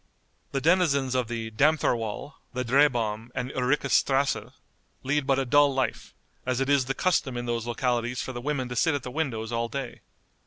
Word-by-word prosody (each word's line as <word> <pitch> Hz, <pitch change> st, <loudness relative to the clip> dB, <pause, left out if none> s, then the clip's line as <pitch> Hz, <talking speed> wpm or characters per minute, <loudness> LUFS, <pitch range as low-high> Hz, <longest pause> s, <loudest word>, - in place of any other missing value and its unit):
The 135 Hz, -, -1 dB
denizens 145 Hz, -6 st, +3 dB
of 125 Hz, -2 st, 0 dB
the 115 Hz, -1 st, -4 dB
Dammthorwall, 120 Hz, -2 st, +1 dB, 0.2 s
the 125 Hz, 0 st, -2 dB
Drehbahm, 120 Hz, -4 st, +2 dB
and 125 Hz, +1 st, -3 dB
Ulricas 135 Hz, +1 st, 0 dB
strasse 135 Hz, 0 st, +2 dB, 0.5 s
lead 140 Hz, +1 st, 0 dB
but 135 Hz, -, +3 dB
a 135 Hz, -, 0 dB
dull 145 Hz, +2 st, +5 dB
life, 130 Hz, -3 st, -2 dB, 0.3 s
as 130 Hz, 0 st, -1 dB
it 135 Hz, +1 st, 0 dB
is 140 Hz, -2 st, +3 dB
the 135 Hz, +2 st, -2 dB
custom 140 Hz, -8 st, +1 dB
in 120 Hz, -, -3 dB
those 120 Hz, -1 st, -2 dB
localities 120 Hz, 0 st, -1 dB
for 130 Hz, -, -4 dB
the 120 Hz, -, -5 dB
women 135 Hz, -2 st, -2 dB
to 125 Hz, -, -5 dB
sit 160 Hz, +5 st, +2 dB
at 140 Hz, -, -3 dB
the 125 Hz, -, -6 dB
windows 125 Hz, -7 st, -2 dB
all 115 Hz, 0 st, -1 dB
day. 135 Hz, 0 st, -5 dB
130 Hz, 190 wpm, -27 LUFS, 120-140 Hz, 0.5 s, dull